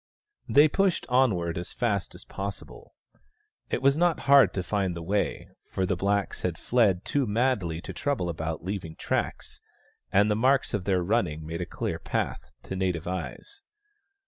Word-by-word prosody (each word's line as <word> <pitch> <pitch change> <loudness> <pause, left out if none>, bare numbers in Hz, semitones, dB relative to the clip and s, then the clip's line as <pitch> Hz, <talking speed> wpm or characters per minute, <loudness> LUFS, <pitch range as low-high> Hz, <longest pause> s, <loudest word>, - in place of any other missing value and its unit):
They 145 +2 +7
pushed 195 +3 +1
onward 95 -10 +2
as 85 - -7
fast 105 -6 -1
as - - -12
possible. 95 -10 -7 0.7
It 130 - -2
was 140 +1 +5
not 170 0 +2
hard 140 0 +6
to 95 - -1
find 95 -2 -1
the 85 - -6
way, 100 +4 -1 0.2
for 95 - -1
the 95 - 0
blacks 100 +3 -1
had 90 -3 -2
fled 105 -7 +2
too 140 -4 0
madly 105 -7 0
to - - -7
trouble 140 -11 -1
about 80 -1 -4
leaving 90 -4 -4
tracks, - - -3 0.5
and 105 +2 +4
the - - +2
marks 130 +5 +2
of 100 -4 -2
their 95 -3 +2
running 85 -7 0
made 85 +2 -4
a 90 - -3
clear - - -3
path, 65 - -3
to - - -5
native 90 -4 -1
eyes. 95 - -5
100 Hz, 170 wpm, -27 LUFS, 85-125 Hz, 0.7 s, They